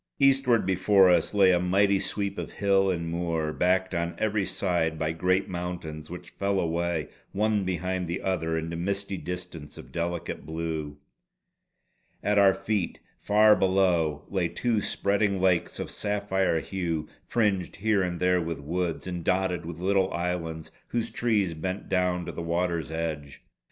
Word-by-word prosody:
Eastward 135 -5 +4
before 95 0 +5
us 90 - +2
lay 95 -2 +6
a 90 - +3
mighty 100 +2 +3
sweep 100 0 -2
of - - -6
hill 95 -1 +2
and 85 -2 -1
moor, 80 -2 -1
backed 95 +1 +1
on 85 0 -1
every 105 -2 0
side 85 -5 0
by 80 0 -1
great 95 +4 +1
mountains 85 -4 -5
which 90 0 -9
fell 100 0 0
away 85 -2 -1 0.3
one 105 0 +1
behind 90 0 -2
the 85 +3 -2
other 80 -4 -1
into 80 +1 -3
misty 100 +3 -2
distance 90 -4 -7
of - - -11
delicate 85 0 -3
blue. 80 -2 -4 1.3
At 105 0 +3
our 95 -1 +6
feet 95 -1 -2 0.2
far 105 +1 +5
below, 90 -6 +2
lay 95 -3 0
two 110 +6 0
spreading 100 -1 +1
lakes 90 -2 +1
of - - -4
sapphire 100 -4 0
hue, 85 -5 -3 0.2
fringed 100 -6 0
here 105 +2 +1
and 90 -2 -2
there 90 0 +3
with 80 -2 -4
woods, 85 +3 -2
and 90 -2 -4
dotted 90 -3 0
with 85 -1 -6
little 95 +1 +1
islands 85 -2 -3 0.2
whose 115 -1 -1
trees 105 -7 +1
bent 95 +5 -4
down 90 -1 +1
to - - -4
the - - -6
water's 85 -1 -1
edge. 80 -3 -4
90 Hz, 155 wpm, -27 LUFS, 85-100 Hz, 1.3 s, lay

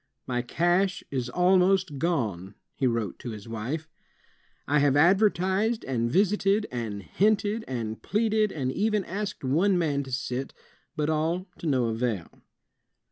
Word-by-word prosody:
"My 125 -1 -1
cash 175 +9 +1
is 130 -3 -2
almost 180 -1 +3
gone," 105 - -1 0.2
he 130 - 0
wrote 115 -5 -2
to 125 - -6
his 110 -1 -8
wife. 120 +8 -4 0.8
"I 150 +1 +3
have 140 -1 +3
advertised, 195 +5 +3
and 120 -3 -1
visited, 200 - +2
and 110 -5 -4
hinted, 210 - +1
and 115 -4 -4
pleaded, 215 0 +1
and 130 -4 -2
even 210 +3 0
asked 195 -1 -4
one 175 +9 +2
man 150 -5 +1
to 135 -1 -8
sit, 130 0 -3 0.4
but 155 -1 0
all 165 +4 0
to 170 - -4
no 130 -5 +2
avail." 115 -5 -1
155 Hz, 140 wpm, -27 LUFS, 125-190 Hz, 0.8 s, almost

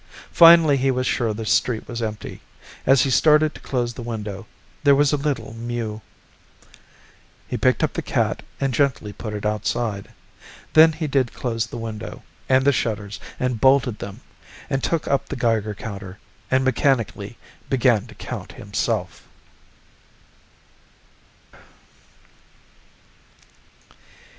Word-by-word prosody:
Finally 165 -4 +7
he 135 +1 +1
was 130 -1 0
sure 120 -4 0
the 110 +1 -5
street 110 +1 +1
was 120 0 -5
empty. 110 -2 -5 0.5
As 135 0 +6
he 135 - 0
started 155 +3 +4
to - - -13
close 120 -2 -2
the 120 - -8
window, 110 -3 -6 0.4
there 140 -1 +6
was 145 +1 +3
a - - +4
little 140 -6 -3
mew. 115 -2 -4 1.5
He - - -4
picked - - +2
up - - 0
the - - -2
cat - - -1 0.2
and 135 -2 0
gently 130 -7 0
put 105 0 -6
it 105 - -5
outside. 105 0 -2 0.6
Then 160 +1 +7
he 155 +1 -4
did 135 -4 0
close 115 -3 -2
the 115 - -8
window, 110 -2 -7 0.3
and 130 0 +4
the 140 - +6
shutters, 110 -5 -3 0.2
and 125 -3 -1
bolted 130 -4 +3
them, 100 -1 -8 0.5
and 135 -1 -1
took 165 -2 -1
up 140 - 0
the - - -3
Geiger 110 -3 0
counter, 100 -3 -8 0.3
and 130 0 +2
mechanically 130 - 0 0.3
began 125 -5 +2
to - - -14
count - - -7
himself. - - -3
120 Hz, 135 wpm, -22 LUFS, 110-135 Hz, 1.5 s, Finally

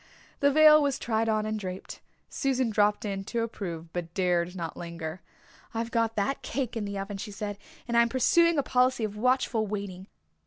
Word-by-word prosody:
The 285 - +4
veil 305 +1 +7
was 280 -2 +1
tried 225 -1 0
on 215 -1 +1
and 215 0 -2
draped. 185 -2 -7 0.3
Susan 260 -4 0
dropped 210 0 +2
in 195 -1 -3
to 230 +2 -1
approve 170 -7 -6
but 170 -1 -5
dared 180 -1 +1
not 170 -2 -5
linger. 170 0 -6 0.5
"I've 230 +1 -2
got 230 -1 +1
that 210 +7 -1
cake 250 -2 -3
in 220 -2 -2
the 200 0 -4
oven," 195 +1 -4
she 210 - -6
said, 205 0 -5 0.3
"and 235 - -1
I 235 - +7
am 235 - +2
pursuing 335 +7 +4
a 285 - +2
policy 255 -2 +2
of 210 -1 -2
watchful 245 -1 +1
waiting. 195 -2 -5
215 Hz, 195 wpm, -28 LUFS, 195-250 Hz, 0.5 s, veil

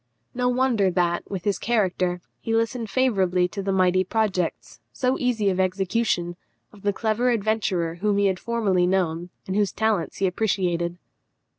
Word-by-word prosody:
No 250 0 +1
wonder 245 -6 +2
that, 175 -1 0
with 190 -3 -4
this 200 -3 0
character, 185 -6 0 0.2
he 225 - -1
listened 230 0 -1
favourably 190 -6 +2
to 200 - -5
the 195 0 -1
mighty 185 -1 +3
projects, 190 -3 -2
so 255 0 0
easy 235 -5 +1
of 185 - -2
execution, 185 -1 0 0.4
of 205 - -15
the 205 - +1
clever 220 +4 0
adventurer 205 -7 0
whom 205 -1 +2
he 200 - +3
had 190 -2 +1
formerly 200 -6 +1
known, 175 -2 0 0.2
and 190 - -3
whose 205 -3 +2
talents 220 -5 0
he 195 - +1
appreciated. 180 -3 0
195 Hz, 160 wpm, -24 LUFS, 180-220 Hz, 0.4 s, mighty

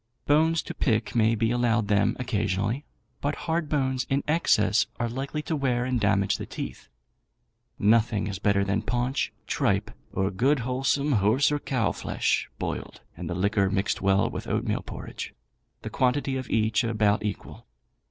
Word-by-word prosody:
Bones 160 +2 +3
to - - -6
pick 115 -6 0
may 115 -1 +3
be 115 +1 +1
allowed 120 -3 +1
them 105 0 +2
occasionally, 110 +1 -1 0.4
but 145 +1 -1
hard 160 -2 -1
bones 130 -3 0
in 135 +1 +1
excess 105 - +3
are 120 - 0
likely 135 +5 -4
to 160 - -2
wear 125 -4 0
and 130 -1 0
damage 100 -1 +2
the - - -6
teeth. - - -7 0.9
Nothing 110 0 +3
is 95 -3 -4
better 100 -1 +2
than 100 +2 0
paunch, 125 +4 -1
tripe, - - 0 0.2
or 95 0 0
good 130 +8 +2
wholesome 135 +4 0
horse 115 +6 +3
or 145 - 0
cow 125 -6 0
flesh, - - -1
boiled, - - -5
and - - -6
the 85 - -2
liquor 100 +1 +2
mixed 95 0 -1
well 100 +1 +3
with - - -6
oatmeal - - -1
porridge; - - -7 0.5
the - - -4
quantity 135 +1 +1
of 130 -2 -4
each 110 +1 +2
about 105 -3 +2
equal. 105 -10 -6
115 Hz, 160 wpm, -26 LUFS, 105-135 Hz, 0.9 s, Bones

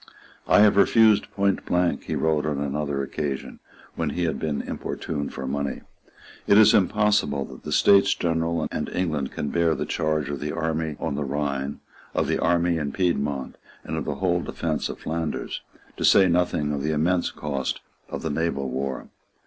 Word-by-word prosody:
"I - - +6
have 105 -1 +5
refused 110 +1 +5
point 100 -1 0
blank," 90 -1 0
he - - -2
wrote 80 -2 +1
on 75 -2 -1
another 70 0 -2
occasion, 70 0 -4 0.3
when 80 -3 -2
he 90 +5 -2
had 80 - -1
been 75 -3 -2
importuned 75 -3 -4
for 65 - -6
money, 70 +1 -3 0.7
"it 100 - +6
is 110 0 +7
impossible 100 -8 +2
that - - -12
the - - -7
States 100 0 +5
General 80 -1 0
and - - -3
England 75 -7 -2
can 75 - -3
bear 85 -2 +2
the - - -3
charge 80 -2 -1
of 70 - -4
the 75 0 -3
army 80 -1 -2
on - - -2
the 75 +1 -2
Rhine, 70 0 -3 0.3
of - - +2
the - - 0
army 85 0 +2
in 75 -3 -2
Piedmont, 70 -6 -1 0.3
and 80 - -4
of 80 - -3
the 75 - -2
whole 90 +2 +1
defence 80 -3 -2
of - - -6
Flanders, 80 -1 -3 0.4
to - - -3
say 95 - +6
nothing 85 -4 +1
of 70 - -2
the 75 +2 0
immense 85 +4 +1
cost 70 -3 -3 0.3
of - - -5
the 80 - -1
naval 70 -4 -1
war. 65 +1 -3
80 Hz, 180 wpm, -25 LUFS, 70-85 Hz, 0.7 s, is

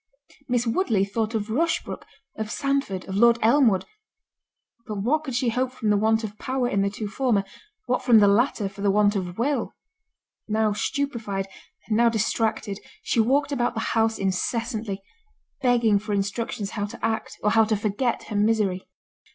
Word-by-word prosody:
Miss 245 -2 +1
Woodley 230 - +1
thought 220 +2 -2
of 215 0 -2
Rushbrook, 320 +7 -1 0.3
of 220 -1 -4
Sandford, 275 -9 -1
of 190 - -5
Lord 235 +3 +5
Elmwood—but 235 - -2
what 255 +10 0
could 265 -5 -4
she 250 -1 +1
hope 250 +2 -1
from 225 -4 -1
the - - +4
want 220 +2 +2
of 215 -1 -6
power 260 -1 -1
in 200 -5 +1
the 200 - +1
two 210 +1 -5
former?—what 255 - -2
from 240 -3 +5
the 205 -1 +6
latter, 210 0 +2
for 195 +1 -10
the 200 - +2
want 205 +1 +3
of 180 -2 -3
will? 275 +5 -1 0.7
Now 215 -1 +1
stupified, 225 -6 -2 0.4
and 215 - 0
now 235 +1 +5
distracted, 220 -2 -1 0.2
she - - 0
walked 275 +6 +2
about 245 -3 0
the - - -1
house 225 -1 +2
incessantly, 210 +1 -2 0.6
begging 235 -5 +3
for 210 +1 -4
instructions 205 +1 -2
how 205 -2 -2
to - - -5
act, 220 0 -2
or 210 - +3
how 225 0 +5
to 215 0 +1
forget 215 +4 -1
her 210 - -7
misery. 205 -3 +1
220 Hz, 165 wpm, -25 LUFS, 205-245 Hz, 0.7 s, the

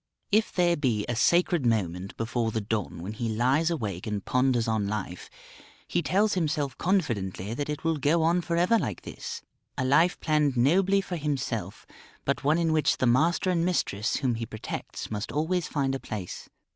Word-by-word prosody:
If 215 +2 +3
there 175 -1 +3
be 120 -9 0
a 120 - -1
sacred 170 +4 +3
moment 95 -5 -1
before 115 0 -1
the 110 - -1
dawn 100 -5 -3
when 100 +4 -5
he 115 +1 -3
lies 130 +9 +2
awake 105 - -3
and 105 -2 -3
ponders 125 -2 +2
on 110 -2 0
life, 95 -4 -4 0.6
he 175 - 0
tells 200 +8 +2
himself 150 -6 -1
confidently 115 - -1
that 145 +4 -3
it 150 0 -4
will 165 -1 +1
go 155 +4 +2
on 170 +2 +3
for 170 0 -2
ever 180 +7 +4
like - - -4
this 465 -1 -7 0.3
a 130 - 0
life 155 +7 +3
planned 150 -4 +1
nobly 190 +10 +4
for 185 -2 -5
himself, 130 - -3 0.4
but - - -1
one 150 +3 +3
in 165 -2 +1
which 155 -2 +2
the - - +1
master 160 +9 +3
and 170 -2 +1
mistress 115 - 0
whom 130 -4 0
he 115 0 -3
protects 110 0 -6
must 105 0 -3
always 160 +3 0
find 135 -3 -1
a 135 - -2
place. 105 -8 -6
135 Hz, 185 wpm, -27 LUFS, 110-170 Hz, 0.6 s, ever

